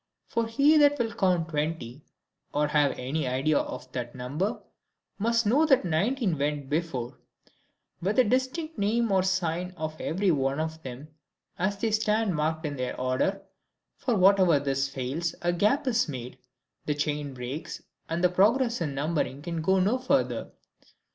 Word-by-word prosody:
For 230 -1 -1
he 285 +7 +4
that 290 0 +5
will 230 -3 -1
count 180 -4 +1
twenty, 150 -4 -3 0.5
or 150 0 +2
have 150 -2 +2
any 135 +3 -2
idea 135 +4 +2
of 130 0 -6
that 120 -1 -5
number, 145 - -2 0.6
must 230 +2 +2
know 260 +9 +4
that 270 -9 +4
nineteen 185 - 0
went 145 -1 -2
before, 150 -7 -2 0.8
with 195 +5 0
the 255 - +6
distinct 260 +7 -1
name 220 +2 +1
or 190 -1 +4
sign 180 -1 -1
of 155 -1 -5
every 190 +3 +1
one 135 -1 0
of 160 0 -3
them, 130 +3 -8 0.5
as 195 +2 0
they 220 +2 -1
stand 215 -1 +1
marked 160 +1 -1
in 145 -2 -3
their 125 0 -3
order; 130 +10 0 0.5
for 245 -4 -1
wherever 185 -5 +5
this 135 -1 -1
fails, 135 +5 -3
a 175 0 +2
gap 215 - +2
is 245 -7 +1
made, 125 -2 -7 0.5
the 150 - +1
chain 145 -1 -2
breaks, 125 +5 -6 0.3
and 165 +2 -2
the 180 - +6
progress 230 +5 +2
in 145 -4 -2
numbering 145 -1 -1
can 170 -1 -3
go 190 +4 +3
no 210 +8 +2
further. 265 +2 0
170 Hz, 160 wpm, -27 LUFS, 145-215 Hz, 0.8 s, the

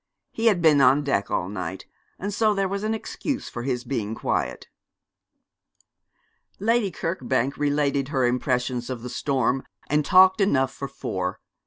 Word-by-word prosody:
He 230 +1 0
had 190 -6 +3
been 150 -3 +6
on 135 +3 +5
deck 135 -8 0
all 90 - -1
night, 95 -1 -5 0.3
and 200 +2 -4
so 215 0 +2
there 195 -1 +1
was 200 +1 -3
an 220 +1 0
excuse 265 +4 -4
for 120 - -6
his 125 -1 -2
being 115 -4 -3
quiet. - - -2 1.9
Lady 225 0 +1
Kirkbank 140 -6 -1
related 145 -2 0
her 135 -3 +1
impressions 125 0 -1
of 125 -3 -5
the 125 - -5
storm, 135 -1 0 0.3
and 150 0 +3
talked 185 +6 +6
enough 135 -9 +2
for 140 - -5
four. 95 -9 -4
140 Hz, 155 wpm, -24 LUFS, 125-185 Hz, 1.9 s, been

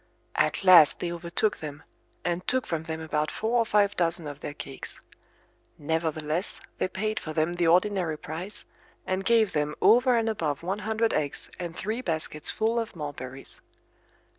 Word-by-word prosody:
At - - +1
last 175 -6 +8
they 175 - -2
overtook 175 +5 -1
them, 150 -2 -7 0.4
and 175 +1 -1
took 260 0 +1
from 160 -1 -3
them 160 -1 -4
about 155 -1 -1
four 230 +2 0
or 230 - +2
five 205 -1 +3
dozen 170 -2 +1
of 145 -1 -6
their 145 - -6
cakes. 135 -3 -6 0.8
Nevertheless 160 +2 -1 0.2
they - - +2
paid 215 +4 -2
for 155 - -6
them 160 +2 +1
the 175 -1 +1
ordinary 180 -2 +3
price, 170 +8 -6 0.4
and 185 +1 -1
gave 225 0 +4
them 150 0 0
over 245 +2 +5
and 225 -1 +1
above 165 -9 -1
one 190 +4 -2
hundred 220 +2 0
eggs 145 -2 -2
and 170 -2 -5
three 220 +4 -2
baskets 155 -6 -3
full 225 +2 +1
of 225 -4 -4
mulberries. 135 -4 -6
175 Hz, 165 wpm, -27 LUFS, 155-210 Hz, 0.8 s, last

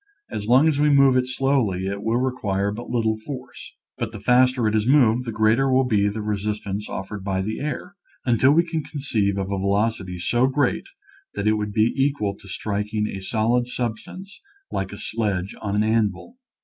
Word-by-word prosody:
As 105 -1 -4
long 130 +6 +5
as 150 -3 +1
we 150 0 +4
move 140 -2 +5
it 125 0 +2
slowly 125 -8 0
it 100 +1 -3
will 115 +2 0
require 105 -6 -1
but 120 +4 -7
little 110 -2 0
force, 130 +1 -9 0.2
but 115 -2 -2
the 110 - -8
faster 125 +1 +3
it 105 - 0
is 110 +1 +1
moved 125 -3 +4
the 115 - -3
greater 110 +5 +2
will 130 +1 +4
be 105 -5 +2
the 105 +1 -5
resistance 105 -1 -3
offered 95 +1 -6
by 95 -1 -1
the 110 +3 -3
air, 150 +6 -4 0.3
until 125 +2 +4
we 165 +3 +4
can 165 -2 -2
con 145 - -7
ceive 105 -8 0
of 95 0 -3
a 100 - -1
velocity 100 -1 0
so 120 +8 +2
great 135 -1 0 0.5
that 100 - -3
it 110 - +4
would 105 -1 -2
be 110 +2 +2
equal 135 -8 0
to 100 - -16
striking 105 +2 -2
a 95 - -6
solid 115 +4 +1
substance 125 - -6 0.3
like 95 -1 -3
a 100 - -8
sledge 100 -5 -2
on 100 -1 -2
an 105 - +2
anvil. 110 - 0
110 Hz, 200 wpm, -23 LUFS, 100-130 Hz, 0.5 s, long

